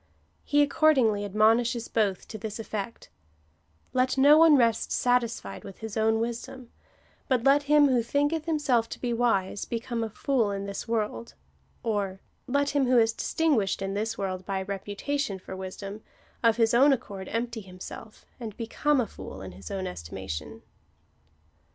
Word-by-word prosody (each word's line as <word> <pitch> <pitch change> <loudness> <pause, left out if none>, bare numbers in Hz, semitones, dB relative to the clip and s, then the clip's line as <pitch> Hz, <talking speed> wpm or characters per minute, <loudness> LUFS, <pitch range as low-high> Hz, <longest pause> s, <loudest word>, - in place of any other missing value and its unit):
He 290 -1 +3
accordingly 265 -9 +3
admonishes 225 +3 +2
both 200 -4 0
to 220 - -7
this 210 0 -5
eifect 220 -1 -6 0.2
— 75 +2 -39
" 80 -1 -38
Let 255 +1 +1
no 285 +3 +7
one 315 -2 +7
rest 230 -3 +2
satisfied 245 -2 0
with 195 -2 -10
his 220 -2 -7
own 220 0 +2
wisdom, 240 +2 -5 0.6
but 255 -4 +1
let 275 +2 +5
him 295 -1 +6
who 255 -3 +3
thinketh 290 +6 0
himself 280 -8 +1
to - - -7
be 240 -1 -1
wise, 205 -5 +1
become 235 0 -3
a 225 - -3
fool 235 0 0
in 200 0 -3
this 200 +2 -5
world," 210 - -2 0.5
or, 200 -4 -1 0.2
" - - -43
Let 285 +2 +1
him 275 -2 +2
who 250 0 +4
is 225 -1 +4
distinguished 265 -13 +1
in 195 0 -2
this 220 +2 -2
world 185 -2 -3
by 190 0 -2
reputation 205 +5 -3
for 190 0 -9
wisdom, 195 +2 -7 0.4
of 230 -1 +4
his 225 -1 +3
own 275 +4 +6
accord 195 -7 -5
empty 230 0 -3
himself,^ 190 +3 -11
and 220 -4 -7
become 275 +5 +1
a 245 - +2
fool 95 - -9
in 95 - -7
his 95 +2 -10
own 190 -1 -3
estimation." 80 - -6
225 Hz, 170 wpm, -27 LUFS, 195-255 Hz, 0.6 s, no